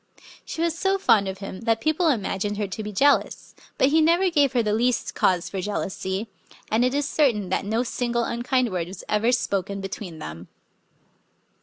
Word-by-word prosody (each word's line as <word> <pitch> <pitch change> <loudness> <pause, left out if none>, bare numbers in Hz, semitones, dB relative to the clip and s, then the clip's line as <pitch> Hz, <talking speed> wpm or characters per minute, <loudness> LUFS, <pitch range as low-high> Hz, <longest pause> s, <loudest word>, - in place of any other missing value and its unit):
She 330 - -4
was 335 -1 0
so 385 +3 +1
fond 215 - +3
of 190 0 -4
him 195 -1 -7
that 225 -1 +1
people 315 +6 +1
imagined 205 -6 -1
her 210 - -1
to 195 +3 -5
be 210 0 -5
jealous. 280 +8 +1 0.2
But 265 - +4
he 315 +2 +4
never 345 +4 +3
gave 285 -5 +3
her 240 -2 +2
the 210 -1 0
least 240 +2 0
cause 180 -2 +1
for 195 - -4
jealousy; 190 +1 -3 0.4
and 220 +3 +3
it 255 +2 +1
is 290 0 0
certain 235 -12 +1
that 190 - -1
no 220 +4 0
single 240 -1 -1
unkind 240 0 0
word 175 -2 -2
was 185 0 -9
ever 215 +3 +2
spoken 200 -5 -1
between 195 -3 -6
them. 85 - -8
225 Hz, 190 wpm, -24 LUFS, 195-270 Hz, 0.4 s, But